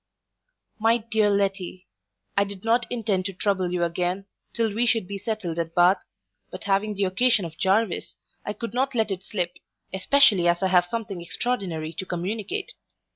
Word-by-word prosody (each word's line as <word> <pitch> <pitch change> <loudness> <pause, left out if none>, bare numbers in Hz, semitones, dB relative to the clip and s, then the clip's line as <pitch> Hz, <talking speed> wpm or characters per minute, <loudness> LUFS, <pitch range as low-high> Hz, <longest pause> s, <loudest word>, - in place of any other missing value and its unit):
MY 225 +2 +4
DEAR 215 -1 +4
LETTY, 195 -2 -1 0.5
I 200 - +4
did 200 -1 -8
not 235 +1 +3
intend 210 -6 0
to 195 - -2
trouble 185 -1 0
you 180 -1 0
again, 180 +3 -1 0.3
till 225 -3 0
we 235 +3 +1
should 225 -5 +2
be 200 0 -5
settled 200 -6 -3
at 165 0 -3
Bath; 175 +2 +5 0.5
but - - -8
having 205 +2 +1
the 200 - 0
occasion 200 +2 +3
of 160 -1 -8
Jarvis, 195 +1 +1 0.3
I 210 - -3
could 230 +2 -6
not 265 +1 0
let 220 -3 +1
it 185 -1 -3
slip, 180 -4 -3 0.4
especially 195 -2 +4
as 175 +2 +2
I 190 - +3
have 180 -1 +4
something 210 -3 -4
extraordinary 170 -5 -2
to 190 - -5
communicate. 210 - -3
195 Hz, 175 wpm, -25 LUFS, 180-225 Hz, 0.5 s, Bath